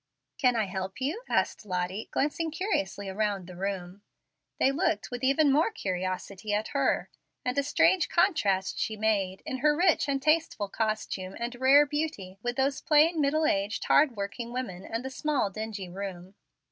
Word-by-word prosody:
"Can 250 Hz, -5 st, +3 dB
I 220 Hz, -2 st, +1 dB
help 190 Hz, 0 st, -5 dB
you?" 300 Hz, -, -2 dB
asked -, -, 0 dB
Lottie, 185 Hz, +1 st, -3 dB
glancing 310 Hz, +3 st, -1 dB
curiously 300 Hz, -, -2 dB
around 200 Hz, -1 st, -1 dB
the 180 Hz, 0 st, -10 dB
room. 190 Hz, 0 st, -4 dB, 0.6 s
They 270 Hz, -, +3 dB
looked 325 Hz, +1 st, -1 dB
with 245 Hz, +1 st, -5 dB
even 275 Hz, +2 st, +4 dB
more 310 Hz, +9 st, +3 dB
curiosity 185 Hz, -, -3 dB
at 210 Hz, +1 st, -2 dB
her; 275 Hz, -2 st, 0 dB, 0.3 s
and 250 Hz, 0 st, 0 dB
a 280 Hz, -, +3 dB
strange 330 Hz, +5 st, +3 dB
contrast 205 Hz, -, +2 dB
she 220 Hz, -, -2 dB
made, 200 Hz, -3 st, 0 dB
in 260 Hz, -, -3 dB
her 295 Hz, +3 st, +3 dB
rich 345 Hz, -4 st, +3 dB
and 275 Hz, -1 st, +1 dB
tasteful 305 Hz, -8 st, +1 dB
costume 215 Hz, -3 st, -2 dB
and 235 Hz, +1 st, -3 dB
rare 265 Hz, +4 st, +6 dB
beauty, 285 Hz, -11 st, -4 dB
with 245 Hz, +1 st, -2 dB
those 270 Hz, +1 st, 0 dB
plain, 310 Hz, +2 st, +4 dB
middle 305 Hz, +3 st, +2 dB
aged, 205 Hz, -4 st, 0 dB
hard 280 Hz, -6 st, +4 dB
working 205 Hz, +4 st, -4 dB
women, 240 Hz, -8 st, -4 dB
and 230 Hz, +3 st, -4 dB
the 265 Hz, -, -4 dB
small, 280 Hz, -7 st, 0 dB
dingy 215 Hz, -2 st, -5 dB
room. 185 Hz, 0 st, -7 dB
235 Hz, 170 wpm, -28 LUFS, 195-295 Hz, 0.6 s, rare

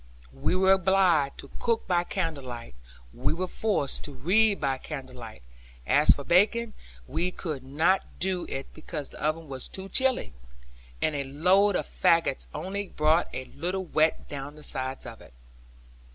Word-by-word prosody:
We 65 Hz, -, 0 dB
were 190 Hz, +1 st, +4 dB
obliged 185 Hz, -6 st, +3 dB
to 140 Hz, -, -14 dB
cook 230 Hz, -2 st, 0 dB
by 175 Hz, -1 st, +2 dB
candle 165 Hz, -9 st, -3 dB
light; 120 Hz, -2 st, -7 dB, 0.4 s
we 130 Hz, -, 0 dB
were 180 Hz, +3 st, -1 dB
forced 185 Hz, -7 st, -1 dB
to 145 Hz, -, -8 dB
read 200 Hz, +10 st, +3 dB
by 135 Hz, -1 st, 0 dB
candle 130 Hz, -4 st, -7 dB
light; 110 Hz, -, -10 dB, 0.4 s
as 145 Hz, +3 st, +3 dB
for 140 Hz, -, -7 dB
baking, 215 Hz, +7 st, +3 dB, 0.3 s
we 175 Hz, -, -1 dB
could 155 Hz, -7 st, -5 dB
not 160 Hz, +8 st, +1 dB
do 185 Hz, -1 st, 0 dB
it, 135 Hz, -, -5 dB
because 155 Hz, -2 st, -6 dB
the -, -, -11 dB
oven 155 Hz, +1 st, -1 dB
was 135 Hz, -2 st, -4 dB
too 190 Hz, 0 st, -7 dB
chill; 265 Hz, +2 st, +4 dB
and 60 Hz, -, -8 dB, 0.8 s
a 140 Hz, -, -1 dB
load 185 Hz, +8 st, +3 dB
of -, -, 0 dB
faggots -, -, +2 dB
only 200 Hz, -, -4 dB
brought 155 Hz, +1 st, +2 dB
a 130 Hz, -, -5 dB
little 180 Hz, +8 st, -3 dB
wet 155 Hz, -1 st, +1 dB
down 145 Hz, +1 st, -6 dB
the 150 Hz, -, -13 dB
sides 130 Hz, -1 st, -3 dB
of -, -, -9 dB
it. -, -, -17 dB
160 Hz, 165 wpm, -27 LUFS, 135-190 Hz, 0.8 s, were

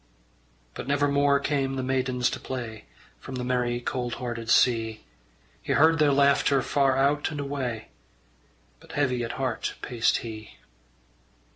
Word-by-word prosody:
But -, -, -7 dB
never 145 Hz, +1 st, +2 dB
more 140 Hz, 0 st, +3 dB
came 140 Hz, -2 st, -1 dB
the 130 Hz, -, -2 dB
maidens 130 Hz, -1 st, 0 dB
to -, -, -4 dB
play 120 Hz, -4 st, -6 dB, 0.3 s
From 130 Hz, -, -8 dB
the 125 Hz, -, -3 dB
merry 125 Hz, -1 st, 0 dB
cold 120 Hz, 0 st, -3 dB
hearted 120 Hz, -2 st, -5 dB
sea; 115 Hz, -3 st, +2 dB, 0.6 s
He -, -, -1 dB
heard 160 Hz, +2 st, +4 dB
their 150 Hz, -2 st, +4 dB
laughter 140 Hz, -1 st, +3 dB
far 135 Hz, -2 st, +2 dB
out 140 Hz, +2 st, +2 dB
and 150 Hz, -2 st, -5 dB
away, 135 Hz, -5 st, -4 dB, 0.9 s
But -, -, -14 dB
heavy 125 Hz, -4 st, 0 dB
at 115 Hz, -, -4 dB
heart 130 Hz, -4 st, -3 dB
paced 120 Hz, -2 st, +1 dB
he. 110 Hz, -2 st, -9 dB
130 Hz, 145 wpm, -26 LUFS, 120-140 Hz, 0.9 s, heard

